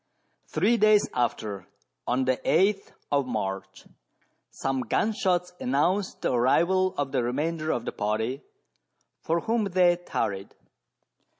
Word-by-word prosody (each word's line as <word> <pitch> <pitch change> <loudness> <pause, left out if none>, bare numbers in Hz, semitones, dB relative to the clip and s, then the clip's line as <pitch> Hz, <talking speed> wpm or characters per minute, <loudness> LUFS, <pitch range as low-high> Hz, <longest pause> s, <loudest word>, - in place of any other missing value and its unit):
Three 210 +9 +2
days 215 -1 +5
after, 105 -5 -2 0.4
on 130 +2 +1
the 130 0 +2
8th 195 +4 +1 0.2
of 140 -2 +1
March, 95 -5 -4 0.6
some 135 -1 -2
gun 125 - 0
shots 180 -3 0
announced 180 +10 0
the - - +1
arrival 175 +10 +2
of 140 -2 -1
the 135 - +1
remainder 155 +6 -2
of 120 -6 -1
the - - -2
party 110 +6 -2 0.8
for 165 +1 0
whom 225 +2 0
they 180 -2 +3
tarried. 100 - -3
145 Hz, 125 wpm, -26 LUFS, 120-185 Hz, 0.8 s, days